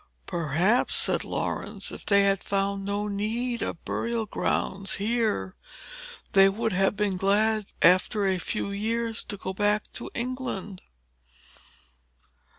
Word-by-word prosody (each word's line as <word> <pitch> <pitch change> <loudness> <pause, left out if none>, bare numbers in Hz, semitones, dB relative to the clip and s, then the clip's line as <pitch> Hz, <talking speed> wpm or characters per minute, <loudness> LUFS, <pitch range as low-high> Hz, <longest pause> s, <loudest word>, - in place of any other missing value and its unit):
"Perhaps," 170 - +1
said - - +2
Laurence, - - -3
"if - - -10
they 200 -1 +5
had 195 -1 +2
found 195 0 -1
no 200 +1 -2
need 225 +4 -2
of - - -4
burial 230 -1 -1
grounds 195 -1 -1
here, 210 - 0 0.8
they 195 0 +7
would 220 +2 -1
have 195 +2 +2
been 205 -2 0
glad, 210 +2 +2 0.2
after 185 +3 +4
a 190 -1 +1
few 200 +1 -3
years, 225 +3 -1
to 205 - -4
go 190 0 -4
back 205 +1 +2
to - - -5
England." 235 -6 -4
200 Hz, 130 wpm, -27 LUFS, 195-220 Hz, 0.8 s, they